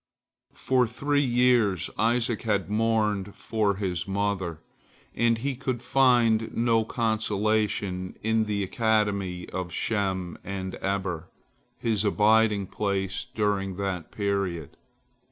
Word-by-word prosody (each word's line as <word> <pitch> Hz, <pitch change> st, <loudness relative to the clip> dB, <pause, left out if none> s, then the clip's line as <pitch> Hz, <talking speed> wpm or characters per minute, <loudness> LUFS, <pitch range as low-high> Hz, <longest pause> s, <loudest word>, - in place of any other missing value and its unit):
For 130 Hz, -2 st, +2 dB
three 145 Hz, +5 st, 0 dB
years 120 Hz, -, +2 dB
Isaac 115 Hz, +1 st, +1 dB
had 105 Hz, -3 st, -1 dB
mourned 105 Hz, -3 st, +1 dB
for 105 Hz, -3 st, 0 dB
his 90 Hz, -2 st, -3 dB
mother, 95 Hz, -4 st, -1 dB, 0.5 s
and 115 Hz, -1 st, +2 dB
he 135 Hz, +3 st, -2 dB
could 130 Hz, -2 st, -3 dB
find 120 Hz, -4 st, +3 dB
no 115 Hz, -1 st, +3 dB
consolation 110 Hz, -4 st, -1 dB
in 110 Hz, 0 st, +2 dB
the 105 Hz, -1 st, -1 dB
academy 100 Hz, -4 st, 0 dB
of 90 Hz, -2 st, -4 dB
Shem 95 Hz, -2 st, -2 dB
and 95 Hz, -1 st, -5 dB
Eber, 95 Hz, -4 st, -2 dB, 0.5 s
his 110 Hz, -3 st, 0 dB
abiding 105 Hz, 0 st, +3 dB
place 95 Hz, -1 st, -2 dB
during 100 Hz, -3 st, 0 dB
that 95 Hz, -4 st, -3 dB
period. 100 Hz, -7 st, -2 dB
105 Hz, 110 wpm, -26 LUFS, 95-115 Hz, 0.5 s, find